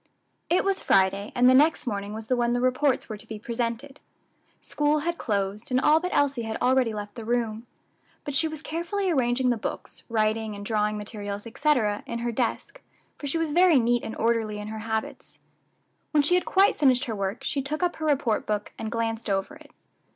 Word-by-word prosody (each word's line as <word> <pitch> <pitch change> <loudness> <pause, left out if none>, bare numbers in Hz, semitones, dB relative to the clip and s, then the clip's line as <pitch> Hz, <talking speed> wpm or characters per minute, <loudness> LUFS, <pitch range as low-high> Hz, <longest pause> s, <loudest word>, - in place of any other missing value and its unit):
_ - - -46 0.5
It 350 - +3
was 390 -1 0
Friday, 195 +2 +2
and 245 0 +5
the 255 - +7
next 300 +5 +4
morning 205 -3 -3
was 220 +1 -6
the 255 - +1
when 240 -1 +1
the 245 - +1
reports 255 +2 +1
were 215 - -6
to 225 - -10
be 220 - -6
presented. 235 +5 -4 0.6
School 295 0 0
had 340 +2 -2
closed, 200 0 -2
and 255 0 +2
all 305 +4 +5
but 360 +2 -3
Elsie 280 -4 +1
had 225 -1 -3
already 255 -2 +3
left 205 -1 -6
the 230 - -8
room; 230 0 -2 0.6
but 290 - -5
she 320 +3 +2
was 315 -1 -7
carefully 355 +4 -2
arranging 250 -3 +2
the 240 - 0
books, - - -6
writing 220 -1 0
and 205 0 -8
drawing 210 -1 0
materials, 205 -1 -6
etc., 230 -5 +1
in 235 - -3
her 235 0 -2
desk, 235 0 -3 0.4
for 290 - -5
she 280 - -1
was 325 -2 -1
very 350 -1 +5
neat 240 0 +2
and 225 - -5
orderly 225 -2 0
in 210 0 -6
her 220 0 -5
habits. 220 0 -4 0.7
When 300 -2 +3
she 300 - +2
had 360 - +3
quite 390 -2 +3
finished 265 -2 +4
her 225 - -3
work 200 +2 -3
she 280 - -1
took 300 +5 -3
up 355 - 0
her 315 - -4
report 265 -7 +1
book, 210 -1 -2
and 220 0 -4
glanced 230 -1 -2
over 195 -1 -1
it. - - -15
240 Hz, 210 wpm, -26 LUFS, 215-285 Hz, 0.7 s, the